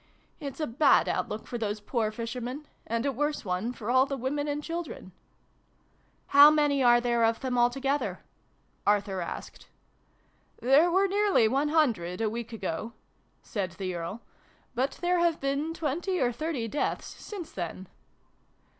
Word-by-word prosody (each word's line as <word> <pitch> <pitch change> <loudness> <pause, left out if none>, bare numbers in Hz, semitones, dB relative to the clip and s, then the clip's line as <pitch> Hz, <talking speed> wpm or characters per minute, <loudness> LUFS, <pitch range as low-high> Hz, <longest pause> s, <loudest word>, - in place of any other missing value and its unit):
It's 280 -3 -6
a 310 - 0
bad 265 +5 +4
outlook 215 - -2
for 240 - -5
those 210 -1 -2
poor 220 +1 -1
fishermen 240 +5 -5 0.2
and 230 +2 -1
a 280 - +2
worse 295 0 -2
one 185 +5 -1
for 235 -1 -4
all 260 +2 +5
the 275 - -3
women 285 +4 -2
and 295 0 -2
children." 330 - -6 0.6
" - - -39
How 285 +1 +10
many 295 -2 +2
are 240 -1 +6
there 240 -1 +1
of 225 0 +2
them 255 -2 -2
altogether? 270 +4 +1 0.3
" - - -25
Arthur 200 -2 +2
asked. 170 - -7 0.5
" - - -35
There 280 +7 +5
were 380 +3 +3
nearly 400 - +3
one 275 +6 +1
hundred, 225 - +1
a 220 -2 0
week 235 0 -5
ago," 210 0 -4 0.5
said 190 -5 -3
the 185 0 -4
Earl: 175 +6 -5 0.5
"but 260 +3 -1
there 355 0 +2
have 340 -2 +2
been 280 +3 -1
twenty 335 +4 -2
or 245 -1 +2
thirty 270 -2 -3
deaths 290 +7 -2
since 385 -7 -8
then." 185 +1 -5
250 Hz, 165 wpm, -28 LUFS, 225-295 Hz, 0.6 s, How